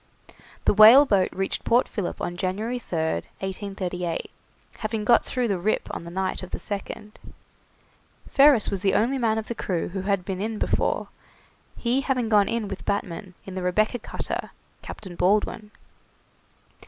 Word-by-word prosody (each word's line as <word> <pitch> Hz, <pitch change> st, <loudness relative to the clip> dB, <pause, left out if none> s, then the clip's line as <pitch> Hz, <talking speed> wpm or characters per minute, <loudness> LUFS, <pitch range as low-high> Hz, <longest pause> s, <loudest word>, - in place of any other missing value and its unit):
The -, -, +4 dB
whaleboat 215 Hz, -1 st, +7 dB
reached 195 Hz, 0 st, -2 dB
Port 240 Hz, +2 st, +3 dB
Philip 200 Hz, -5 st, -4 dB
on 175 Hz, -, -3 dB
January 205 Hz, +7 st, -2 dB
3rd, 160 Hz, -, -2 dB, 0.2 s
1838, 185 Hz, -3 st, -4 dB, 0.5 s
having 215 Hz, -1 st, -3 dB
got 235 Hz, +1 st, +5 dB
through 250 Hz, -2 st, -1 dB
the 195 Hz, -4 st, -1 dB
Rip 215 Hz, +5 st, 0 dB
on -, -, -6 dB
the -, -, -7 dB
night 190 Hz, +2 st, -2 dB
of 185 Hz, -, -8 dB
the -, -, -4 dB
2nd. 210 Hz, +1 st, -5 dB, 1.2 s
Ferris 275 Hz, -6 st, +5 dB
was 195 Hz, -, -2 dB
the 195 Hz, -1 st, +2 dB
only 260 Hz, +5 st, +2 dB
man 220 Hz, -2 st, +1 dB
of 220 Hz, -, -3 dB
the -, -, -3 dB
crew 180 Hz, -6 st, -2 dB
who 190 Hz, +1 st, -4 dB
had 195 Hz, -2 st, 0 dB
been 190 Hz, 0 st, -3 dB
in 220 Hz, +1 st, -2 dB
before, -, -, 0 dB, 0.7 s
he 250 Hz, +3 st, +1 dB
having 255 Hz, -4 st, 0 dB
gone 205 Hz, -2 st, +4 dB
in 230 Hz, -2 st, -1 dB
with 195 Hz, -1 st, -7 dB
Batman, 195 Hz, -1 st, -3 dB
in 190 Hz, -, -8 dB
the 185 Hz, -, -4 dB
'Rebecca' 215 Hz, +7 st, +1 dB
cutter, -, -, -5 dB, 0.3 s
Captain 185 Hz, -4 st, -9 dB
Baldwin. 210 Hz, +3 st, +1 dB
205 Hz, 160 wpm, -25 LUFS, 185-225 Hz, 1.2 s, whaleboat